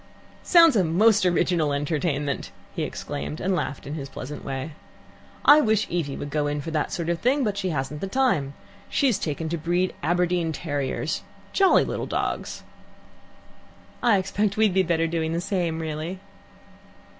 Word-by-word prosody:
"Sounds 335 -6 +6
a 195 - +4
most 195 +4 +4
original 170 -3 +2
entertainment!" 145 -1 -1 0.3
he - - -2
exclaimed, 145 +1 -4
and 190 +1 0
laughed 145 -5 -3
in 145 - -5
his 140 -3 -5
pleasant 145 +3 -7
way. 135 +3 -4 0.7
"I 300 - +8
wish 215 -4 +2
Evie 160 -5 -2
would 145 - -6
go 145 -1 0
to 145 +2 -4
that 155 -2 -1
sort 170 -2 -3
of 170 -1 0
thing. 265 +6 +2
But 210 -4 0
she 195 -2 -2
hasn't 145 -1 -3
the 195 - -2
time. 190 - +1 0.3
She's 265 -7 +2
taken 160 +1 -3
to 170 0 -2
breed 175 +3 0
Aberdeen 175 0 +1
terriers 145 -5 -2 0.3
jolly 390 -1 +5
little - - -3
dogs. - - -3 1.4
"I 235 -4 +4
expect 200 +2 -1
we'd 215 -3 +3
better 165 -1 +2
be 165 - -3
doing 160 -1 -1
the 170 - 0
same, 175 -3 -1
really." 160 +3 -4
170 Hz, 160 wpm, -25 LUFS, 150-195 Hz, 1.4 s, I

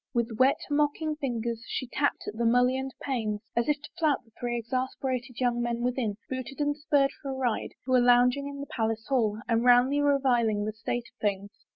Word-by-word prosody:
With 230 -2 -1
wet, 260 +2 +5
mocking 300 +1 +1
fingers 235 -5 -3
she - - -3
tapped 285 +3 -1
at 210 - -5
the 235 - -1
mullioned 250 +3 +2
panes 220 -6 -2
as 235 +4 +1
if 295 0 +2
to - - -9
flout 310 -4 +1
the 225 - -25
three 240 0 -2
exasper 260 +2 -2
ated 250 -1 -7
young 240 -1 +1
men 240 0 -1
within, 240 -4 -1
booted 260 +1 -5
and 290 0 +1
spurred 285 -2 +2
for 275 - -5
a 265 - -3
ride, 250 -4 -2
who 260 - -3
were 255 - +6
lounging 245 +3 +4
in 285 0 -7
the - - -4
palace 225 -3 -2
hall 225 -6 +2
and 230 -1 +2
roundly 250 +4 +5
reviling 245 -7 +2
the 215 - -3
state 230 +2 -3
of - - -63
things. 200 -1 -1
250 Hz, 210 wpm, -28 LUFS, 230-275 Hz, -, were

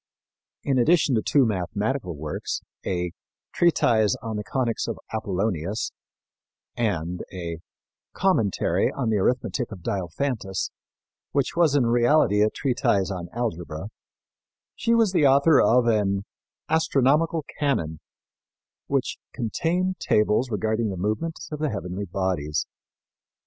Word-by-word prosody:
In 135 -2 +1
addition 155 +2 +4
to 110 - +2
two 140 +4 +3
mathematical 100 - -2
works, 75 +1 -4 0.2
a 90 -2 -2 0.4
Treatise 115 - +3
on 110 -1 -3
the 105 - -3
Conics 120 +1 -1
of - - -3 0.2
Apollonius 100 -1 -1 0.8
and 90 -7 -1
a 85 -3 -5 0.5
Commentary 180 - +1
on 125 -5 -1
the 105 - +2
Arithmetic 120 +1 0
of 95 -5 -9
Diophantus, 95 - -2 0.6
which 140 -2 0
was 165 -4 +4
in 135 -4 +4
reality 120 -2 +4
a 105 - +4
treatise 120 -7 0
on 90 -2 -5
algebra, 90 -6 -4 0.9
she 230 0 +2
was 225 -4 +4
the 155 -6 +4
author 140 +3 +5
of 120 +3 +4
an 100 -3 +1 0.4
Astronomical 160 0 +2
Canon, 85 - 0 0.9
which 135 -2 -1
contained 175 +10 -1
tables 105 +4 +2
regarding 110 +1 0
the 95 - -4
movements 110 - -3
of 150 - -4
the 155 -1 0
heavenly 95 -1 -4
bodies. 90 -5 -1
110 Hz, 120 wpm, -25 LUFS, 95-140 Hz, 0.9 s, author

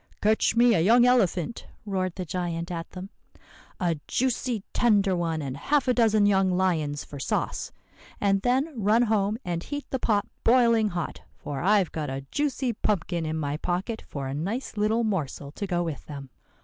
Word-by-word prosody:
"'Catch 220 +2 +2
me 240 0 +5
a 185 - +3
young 235 +8 +5
elephant,' 230 -5 +1 0.2
roared 185 -3 -2
the 185 - -4
giant 170 0 -3
at 165 -1 -5
them. 190 +2 -8 0.7
'A 175 -4 0
juicy, 245 -3 -1
tender 205 -5 +3
one, 165 -3 -1
and 135 -2 -4
half 280 - +1
a 250 - +4
dozen 220 -3 +4
young 195 -2 +3
lions 170 -6 0
for 140 - -9
sauce. - - -2 0.5
And 195 -1 +2
then 265 +7 +1
run 215 +4 +4
home 210 -2 +1
and 170 -1 -2
heat 290 +8 -5
the 265 - -1
pot 210 -4 +1 0.2
boiling 230 -2 +4
hot; 175 -4 -4 0.2
for 145 -2 -5
I've 195 -1 +3
got 150 -3 -3
a 135 0 -5
juicy 275 -4 0
pumpkin 175 -6 -1
in 155 +1 -2
my 145 -1 -2
pocket 185 +8 -2
for 140 -2 -5
a 135 - -3
nice 200 - -3
little 215 +3 +1
morsel 155 - -2
to 200 +6 -5
go 175 -2 0
with 160 -5 -5
them. 140 -3 -8
195 Hz, 180 wpm, -26 LUFS, 165-225 Hz, 0.7 s, me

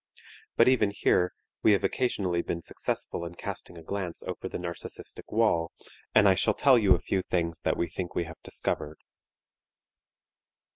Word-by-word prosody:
But 115 - +6
even 130 -5 +4
here 90 -3 +2 0.3
we 105 - +6
have 100 -1 +1
occasionally 95 -9 0
been 85 -1 -4
successful - - -3
in 85 +1 -7
casting 85 - -6
a 80 - -10
glance 90 -1 -4
over - - -5
the - - -4
narcistic 85 -1 -6
wall 105 -7 +2 0.4
and 100 - +7
I 95 - +7
shall - - +2
tell 130 -4 +5
you 95 -4 +5
a - - -3
few 95 +2 -1
things 85 -2 -2
that - - 0
we 85 - 0
think 90 +1 -5
we - - +1
have 85 -1 -11
discovered. 75 +1 -3
90 Hz, 165 wpm, -28 LUFS, 85-100 Hz, 0.4 s, and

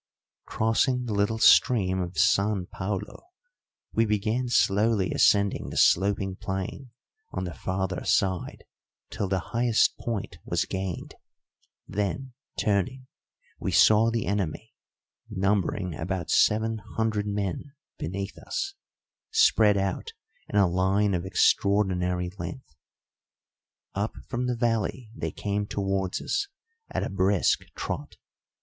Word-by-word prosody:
Crossing 125 +3 +1
the 115 - -3
little 100 +2 +1
stream 95 -5 +5
of 90 0 -5
San 100 -1 +2
Paulo, 95 +1 -5 0.7
we 115 - +3
began 110 +3 0
slowly 105 -2 +2
ascending 100 -1 +3
the - - -6
sloping 95 0 +3
plain 95 +8 -5 0.4
on - - -4
the 90 -2 -5
farther 95 0 -3
side 95 -2 0 0.5
till 100 - -2
the 95 0 0 0.2
highest 120 -1 +3
point 115 -4 -4
was - - 0
gained; 95 -2 -4 0.7
then, 105 +6 -3 0.2
turning, 115 +6 0 0.5
we - - -2
saw 110 +1 +6
the 115 -2 -1
enemy, 95 -4 -2 0.6
numbering 95 -1 0
about 85 +3 -3
seven 110 +1 +3 0.2
hundred 110 -2 0
men, 100 - -3 0.3
beneath 100 +4 -4
us, 390 +1 -3 0.6
spread 110 - +4
out 95 -1 -2 0.4
in - - -6
a 100 -2 +5
line 95 +3 +2
of 90 +1 -2
extraordinary 90 -3 +2
length. 130 - -7 1.2
Up 100 +3 -2
from 125 0 -2
the 125 -1 -1
valley 115 0 -1
they - - -3
came 100 0 -2
towards 95 -2 -1
us 400 - -1 0.4
at - - -2
a - - -2
brisk 95 0 +2 0.2
trot. - - -5
100 Hz, 120 wpm, -27 LUFS, 95-110 Hz, 1.2 s, saw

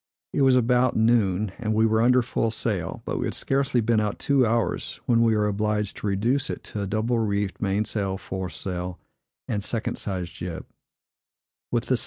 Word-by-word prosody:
It - - +1
was 135 -1 +5
about 125 0 +3
noon, 110 -4 +2
and 110 -2 -1
we 110 +1 +4
were 110 0 +3
under 125 +1 +5
full 115 0 0
sail; 105 -6 -2
but - - -2
we - - -1
had - - -3
scarcely 135 -3 +1
been 115 0 +2
out 105 -1 -1
two 135 -4 +3
hours, 115 -4 -1
when 115 -1 +3
we 115 -1 +4
were 105 0 +2
obliged 105 0 -1
to - - -4
reduce 120 +8 +1
it - - -5
to 105 - -2
a 100 - -2
double 110 +4 0
reefed 100 -3 -1
mainsail, 100 -1 0
foresail, 90 -1 -5 0.5
and 105 -3 -2
second 115 +1 -2
sized 90 -4 -4
jib. 85 -2 -6
110 Hz, 175 wpm, -25 LUFS, 100-115 Hz, 0.5 s, was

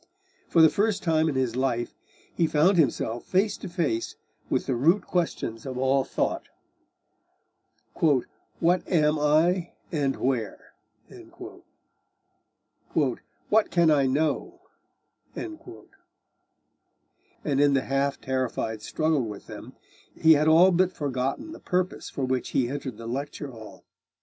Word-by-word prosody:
For 165 - +5
the 160 - +8
first 210 +2 0
time 160 -2 +2
in 145 - -3
his 130 -3 0
life 125 -2 -1 0.4
he 165 - +1
found 160 +5 +3
himself 120 -6 0
face 195 +3 +1
to - - -8
face 160 -10 -2 0.3
with - - 0
the 130 - -1
root 170 - +2
questions 140 -10 -2
of 130 -2 -6
all 135 +1 +2
thought - - -2 1.4
'What 165 +4 0
am 155 -3 +2
I, 165 +4 +2 0.2
and 140 -4 0
where?' 125 -5 -3 2.2
'What 160 - 0
can 170 -3 +3
I 140 -3 +3
know?' 155 - -1 0.7
And 345 - -5 2.1
in 145 -1 +4
the 135 - +2
half 140 +1 -1
terrified 130 -4 -2
struggle 155 +7 0
with 105 -2 -8
them, - - -10 0.4
he 160 0 +7
had 150 +1 +2
all 170 +4 +6
but 185 +1 +2
forgotten 140 - -3
the 325 - -10
purpose 180 0 -2
for 135 - -3
which 130 -1 -2
he 120 -2 0
entered 135 -4 -5
the 115 - -9
lecture 140 +3 -5
hall. 110 -3 -12
145 Hz, 125 wpm, -26 LUFS, 130-170 Hz, 2.2 s, the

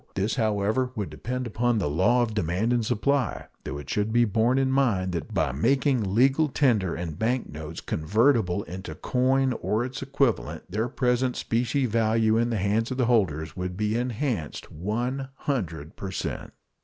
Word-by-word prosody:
This, 100 +3 0
however, 110 +2 +1
would 105 -3 -3
depend 125 +2 -4
upon 120 +1 +1
the 95 - 0
law 95 +12 +3
of 110 -2 -3
demand 100 +4 0
and 120 -1 +1
supply, 125 +2 0 0.2
though 70 - -5
it 70 -2 -8
should 105 +1 0
be 120 +1 +4
borne 115 +4 +2
in 135 -1 +2
mind 110 -9 +2
that 85 -4 -4
by - - +1
making 120 - +1
legal 135 +6 +4
tender 115 - +2
and 80 -3 -5
bank 120 +3 0
notes 75 +2 -7
convertible 100 - +2
into 90 -3 -7
coin 130 - +1
or 110 +3 0
its 130 +1 -6
equivalent 135 - 0
their 110 +5 -1
present 125 0 +1
specie 125 +4 0
value 110 -1 +2
in 120 +1 +2
the 115 - 0
hands 105 +4 +1
of 130 - -3
their 125 - +2
holders 80 -11 +1
would 90 0 -4
be 105 +1 0
enhanced 120 - -2
100 115 - -3
per 95 - -6
cent. 95 - -4
115 Hz, 170 wpm, -26 LUFS, 95-125 Hz, 0.2 s, be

